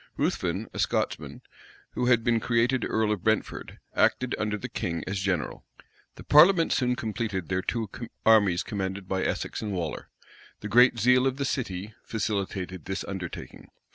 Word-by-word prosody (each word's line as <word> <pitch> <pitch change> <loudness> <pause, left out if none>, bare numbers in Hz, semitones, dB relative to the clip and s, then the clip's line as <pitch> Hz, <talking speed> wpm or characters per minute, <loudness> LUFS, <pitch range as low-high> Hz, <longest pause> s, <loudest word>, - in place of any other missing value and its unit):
Ruthven, - - -1
a - - -6
Scotchman, - - -1 0.5
who 125 - -1
had 120 -2 +4
been 115 -1 +2
created 120 +2 +1
earl 110 -1 +1
of 105 -5 -2
Brentford, 110 -1 -1 0.2
acted 130 -1 +2
under 105 0 -1
the - - -6
king 85 -1 -3
as 95 0 -3
general. 95 -4 -2 0.5
The - - -11
parliament 165 +3 +6
soon 125 -1 +1
completed 110 -6 -3
their 95 0 0
two 110 +3 -2 0.4
armies 105 -6 +5
commanded 95 -1 -4
by 95 0 -1
Essex - - -2
and 105 -2 -3
Waller. 85 -4 -4 0.5
The 105 - -5
great 120 +3 +6
zeal 125 +3 +4
of 135 0 -1
the 140 - -1
city 105 -6 -3
facilitated 95 -5 -3
this 95 0 -3
undertaking. 95 -3 -7
105 Hz, 160 wpm, -27 LUFS, 95-120 Hz, 0.5 s, parliament